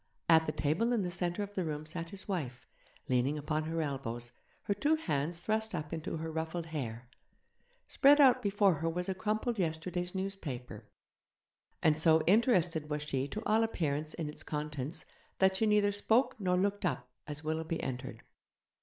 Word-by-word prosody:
At 160 -1 +5
the - - +1
table 160 +13 +1
in 225 -4 +1
the 180 - -2
centre 175 +2 -1
of 205 0 -7
the 190 - -1
room 155 -1 -4
sat 165 +1 -4
his 190 +1 -6
wife, 135 -11 -3 0.4
leaning 130 +4 +1
upon 155 +1 -1
her 165 0 -1
elbows, 120 -4 -4 0.3
her 200 - 0
two 295 +10 +2
hands 165 - -2
thrust 220 +2 0
up 150 +2 -4
into 160 0 -3
her 160 0 -4
ruffled 160 +1 -3
hair; 125 -7 -5 0.8
spread 290 +1 +5
out 265 -4 +7
before 200 -1 +3
her 165 - +1
was 180 +2 -2
a 190 - 0
crumpled 215 +3 -1
yesterday's 175 +2 -2
newspaper, 190 -10 -5 1.0
and 155 -1 +4
so 160 -1 +4
interested 180 - +3
was 150 0 -2
she 135 -2 -1
to 215 +10 -5
all 220 +1 +3
appearance 155 -9 -1
in 165 -3 -3
its 150 - -7
contents 150 +1 -4 0.3
that 190 0 +4
she 220 - +2
neither 210 -1 +4
spoke 220 +5 +2
nor 180 -2 +1
looked 200 +2 0
up 130 -8 -1 0.2
as 150 0 -5
Willoughby 160 +1 -2
entered. 125 -2 -5
165 Hz, 175 wpm, -32 LUFS, 150-200 Hz, 1.0 s, out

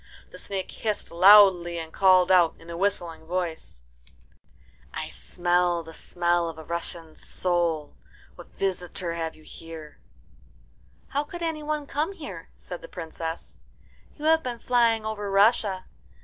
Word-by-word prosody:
The - - -11
snake 195 -2 -4
hissed 215 -2 -2
loudly, 180 -1 +7
and 160 -1 -6
called 185 -1 +5
out 175 -3 +5
in 165 +1 -12
a - - -5
whistling 175 -4 -2
voice, 170 - -4 1.1
"I - - -5
smell 175 -1 0
the 165 0 -11
smell 175 0 0
of 160 - -9
a 160 - -8
Russian 170 0 -4
soul. 170 -4 -1 0.4
What - - -13
visitor 180 -2 -3
have 165 -1 -4
you 155 - -18
here?" 160 -1 -10 1.1
"How 285 +1 0
could 345 +3 -8
any 320 -2 -2
one 300 -1 -2
come 300 +7 -2
here?" 195 - -9
said 180 - -8
the - - -10
Princess. 165 -1 -6 0.6
"You 300 - -6
have 320 0 +5
been 250 -5 -4
flying 230 -2 +2
over 210 -2 -3
Russia. 200 -1 +3
180 Hz, 145 wpm, -26 LUFS, 170-215 Hz, 1.1 s, loudly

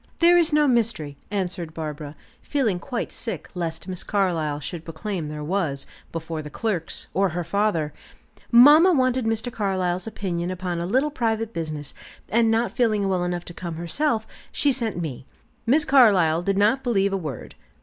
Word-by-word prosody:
"There 345 +1 +6
is 335 -2 +4
no 300 0 +4
mystery," 220 - 0
answered 180 -5 -3
Barbara, 150 -2 -6 0.3
feeling 230 -11 0
quite 245 +4 -4
sick 230 - -5
lest 170 -1 -4
Miss 185 -2 -4
Carlyle 165 -7 0
should 155 +3 -6
proclaim 165 +1 -4
there 150 0 -6
was, 155 -5 -1 0.3
before 160 -1 -4
the 150 - -8
clerks, 185 -1 -2
or 195 +1 +2
her 175 +1 -3
father. 170 -4 0 0.6
"Mamma 295 +9 +8
wanted 255 -3 +2
Mr. 225 +2 -1
Carlyle's 185 -2 -1
opinion 180 -5 -3
upon 180 -1 -3
a 170 - -2
little 265 +9 +1
private 225 -4 -1
business, 155 -3 -5 0.4
and 230 0 +3
not 225 +2 +1
feeling 215 -5 +1
well 185 -2 +1
enough 175 -1 -3
to 175 - -8
come 170 -2 -6
herself, 220 - -1 0.3
she 290 - +2
sent 230 -7 -1
me." 135 -6 -5 0.4
Miss 295 +5 +4
Carlyle 195 - +5
did 195 +2 0
not 215 +6 +3
believe 200 -6 +1
a - - +2
word. 150 - -6
190 Hz, 170 wpm, -24 LUFS, 165-230 Hz, 0.6 s, Mamma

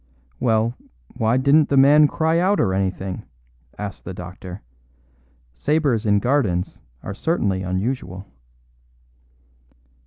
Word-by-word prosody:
"Well, 115 0 +1 0.4
why 115 +2 +1
didn't 140 +3 +4
the 140 - +2
man 145 +3 +7
cry 160 +3 +1
out 195 +3 +2
or 95 -4 +2
anything?" 95 -1 -2 0.6
asked 100 -1 -6
the 95 - -7
doctor; 90 +1 -9 0.9
"sabres 130 - 0
in 100 0 +4
gardens 105 -7 0 0.2
are 95 - -5
certainly 100 - -1
unusual." 95 0 -3
110 Hz, 105 wpm, -22 LUFS, 95-140 Hz, 0.9 s, man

